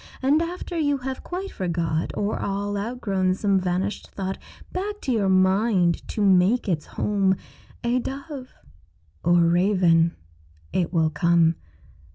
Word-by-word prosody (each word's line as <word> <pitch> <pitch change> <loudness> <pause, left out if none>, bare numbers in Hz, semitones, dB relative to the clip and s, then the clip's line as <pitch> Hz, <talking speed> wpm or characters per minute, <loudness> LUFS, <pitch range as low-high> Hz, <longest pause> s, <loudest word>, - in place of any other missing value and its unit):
And 290 +4 +4
after 350 +1 -4
you 290 -2 +2
have 265 0 -5
quite 380 +2 -5
forgot 165 -3 -1
Or 205 +1 -1
all 200 +1 -2
outgrown 200 -4 -1
some 195 -1 +2
vanished 185 +2 -2
thought, 190 -1 -4 0.3
Back 410 +3 -3
to 265 - -2
your 210 -5 +2
mind 190 -1 +2
to 210 - -2
make 195 +6 +4
its 165 -5 -1
home, 195 -2 +1 0.5
A 240 +1 +1
dove 275 +1 -6 0.7
or 175 0 +4
raven, 170 -1 +3 0.6
it 175 -3 0
will 160 -3 +2
come. 165 +1 +3
195 Hz, 135 wpm, -24 LUFS, 175-250 Hz, 0.7 s, And